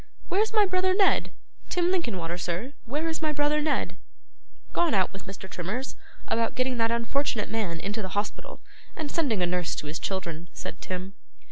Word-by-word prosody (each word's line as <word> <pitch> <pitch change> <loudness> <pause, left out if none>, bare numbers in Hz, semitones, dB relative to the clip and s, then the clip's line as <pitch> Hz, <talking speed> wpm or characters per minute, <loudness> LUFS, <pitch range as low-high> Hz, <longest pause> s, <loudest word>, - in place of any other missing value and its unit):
Where 390 - +4
is 440 - +2
my 425 -2 +6
brother 370 0 +3
Ned? 390 -1 +4 0.4
Tim 355 0 +3
Linkinwater, 185 - 0
sir, 180 +11 -2
where 295 +7 -1
is 320 0 -1
my 310 -1 +2
brother 295 +1 +3
Ned?' 300 -1 +1 0.8
'Gone 340 -8 +3
out 190 -1 +3
with 195 0 -9
Mr. 195 0 -7
Trimmers, 190 +9 -3 0.3
about 230 0 +1
getting 255 0 +1
that 225 0 +3
unfortunate 235 0 0
man 200 -7 -1
into 205 +5 -2
the 190 0 -4
hospital, 215 - -3 0.3
and 305 -2 -3
sending 240 - +2
a - - +5
nurse 175 -1 0
to - - -4
his 150 +2 -3
children,' 170 -3 -3
said - - -6
Tim. 185 +1 -4
230 Hz, 180 wpm, -28 LUFS, 185-310 Hz, 0.8 s, my